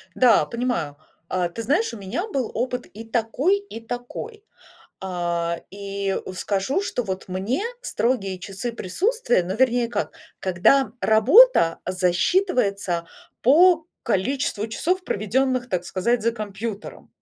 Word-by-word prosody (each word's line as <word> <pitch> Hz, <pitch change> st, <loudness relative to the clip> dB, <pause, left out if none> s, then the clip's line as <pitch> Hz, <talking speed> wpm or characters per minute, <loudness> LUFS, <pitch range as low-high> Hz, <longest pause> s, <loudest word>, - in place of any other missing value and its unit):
Да, 245 Hz, -3 st, +5 dB
понимаю. 235 Hz, -, -2 dB, 0.3 s
А, 180 Hz, -1 st, -1 dB
ты 200 Hz, +7 st, -6 dB
знаешь, 290 Hz, -, +1 dB
у -, -, -6 dB
меня 210 Hz, -, -4 dB
был 270 Hz, -, -2 dB
опыт 250 Hz, +1 st, -2 dB
и 220 Hz, -, -10 dB
такой, 235 Hz, -, +1 dB
и 400 Hz, -, -9 dB
такой. 245 Hz, -, -6 dB, 0.6 s
А, 170 Hz, -2 st, -2 dB
и 200 Hz, 0 st, -3 dB, 0.2 s
скажу, 200 Hz, -, -1 dB
что 395 Hz, -10 st, -2 dB
вот 190 Hz, -4 st, -4 dB
мне 195 Hz, -, -1 dB, 0.2 s
строгие 225 Hz, -, -1 dB
часы 195 Hz, +6 st, -5 dB
присутствия, 350 Hz, -, 0 dB
но 180 Hz, +2 st, -4 dB
вернее 245 Hz, 0 st, +2 dB
как, 235 Hz, -, -2 dB, 0.3 s
когда 200 Hz, +7 st, +3 dB
работа 220 Hz, -, +6 dB
засчитывается 185 Hz, -, +1 dB, 0.4 s
по 330 Hz, +5 st, +5 dB, 0.2 s
количеству 225 Hz, +1 st, 0 dB
часов, 360 Hz, +11 st, -1 dB
проведенных, 255 Hz, -, 0 dB
так 180 Hz, -5 st, -1 dB
сказать, 225 Hz, +6 st, 0 dB
за 230 Hz, +1 st, +2 dB
компьютером. 210 Hz, -1 st, -6 dB
225 Hz, 125 wpm, -23 LUFS, 190-260 Hz, 0.6 s, работа